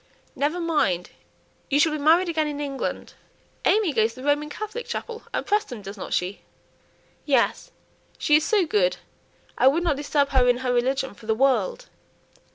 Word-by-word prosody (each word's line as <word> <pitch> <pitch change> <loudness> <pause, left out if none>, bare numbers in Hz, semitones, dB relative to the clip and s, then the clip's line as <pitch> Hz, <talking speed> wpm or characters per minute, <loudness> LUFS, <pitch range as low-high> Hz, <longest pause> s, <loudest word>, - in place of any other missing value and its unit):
"Never 300 +5 -1
mind! 295 - 0 0.6
you 285 - +2
shall 315 +1 +4
be 305 - -3
married 330 +5 +4
again 315 -2 0
in 290 -1 -4
England. 280 -2 -4 0.5
AimÄe 410 -7 +3
goes 220 +1 +2
to 255 - -10
the - - -5
Roman 295 +1 +1
Catholic 430 +8 -6
chapel 465 0 -5
at - - -2
Prestham, 405 - -1
doesn't 195 0 -8
she?" 185 +3 -2 0.8
"Yes. 270 -5 +1 0.5
She 295 - +3
is 310 - -1
so 410 -2 +2
good 430 +9 +1 0.6
I - - +5
wouldn't 320 +2 +3
disturb 285 -1 0
her 255 -2 +3
in 245 - +3
her 250 - +1
religion 260 +1 0
for 215 - -15
the 220 - +2
world." 475 - +1
290 Hz, 165 wpm, -24 LUFS, 255-340 Hz, 0.8 s, I